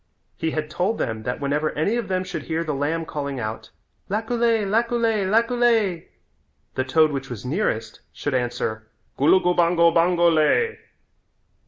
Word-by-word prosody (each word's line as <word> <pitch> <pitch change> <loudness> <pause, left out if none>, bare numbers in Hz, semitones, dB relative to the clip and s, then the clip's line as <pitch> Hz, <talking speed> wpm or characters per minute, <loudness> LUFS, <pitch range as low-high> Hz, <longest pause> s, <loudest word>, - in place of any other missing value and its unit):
He 160 - -2
had 155 -1 -3
told 200 +5 0
them 110 -3 -3
that 125 +3 -4
whenever 145 +2 0
any 160 +9 0
of 235 -4 -2
them 185 0 -1
should 175 -4 -5
hear 160 +3 -2
the 155 -2 -3
lamb 155 +4 -1
calling 140 -4 -4
out, 110 0 -5 0.4
"Laculay, 225 +1 +1
laculay, 225 -1 +1
laculay," 230 -5 +2 0.7
the 130 - -1
toad 155 +4 +3
which 135 -1 -4
was 120 -1 -7
nearest 125 - -2
should 145 - -4
answer, 120 -3 -2 0.3
"Gulugubango, 170 +1 +4
bango 170 +1 +3
lay." 160 - +2
165 Hz, 145 wpm, -23 LUFS, 140-210 Hz, 0.7 s, Gulugubango